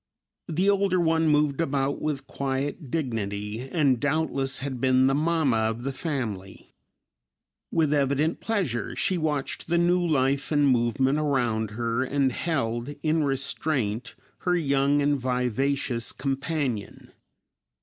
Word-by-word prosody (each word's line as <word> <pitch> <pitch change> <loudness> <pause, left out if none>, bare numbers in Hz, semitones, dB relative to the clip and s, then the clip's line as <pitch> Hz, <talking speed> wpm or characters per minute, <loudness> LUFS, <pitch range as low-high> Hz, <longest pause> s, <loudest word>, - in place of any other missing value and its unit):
The 180 +3 0
older 200 -2 +3
one 165 -1 +2
moved 150 0 +2
about 140 -2 -1
with 145 -3 -2
quiet 140 +3 -3
dignity 110 -4 -3
and 140 -7 +2
doubtless 140 -2 0
had 130 -3 -5
been 130 0 +4
the 135 - +3
"mamma" 155 -4 +2
of 110 +2 -1
the 135 - -2
family. 115 - -5 1.0
With 155 -3 +2
evident 145 +3 +1
pleasure 170 - -2
she 185 -2 +1
watched 150 -4 -2
the 170 +1 +2
new 175 +1 +3
life 140 -3 +1
and 145 -2 +3
movement 130 +3 +2
around 120 -7 0
her, 115 +1 0
and 135 0 +1
held 130 -3 -2
in 155 0 +2
restraint 135 -4 -1 0.2
her 180 -1 +1
young 140 -2 +2
and 145 -1 +2
vivacious 125 0 0
companion. 135 -5 -3
140 Hz, 130 wpm, -26 LUFS, 125-155 Hz, 1.0 s, been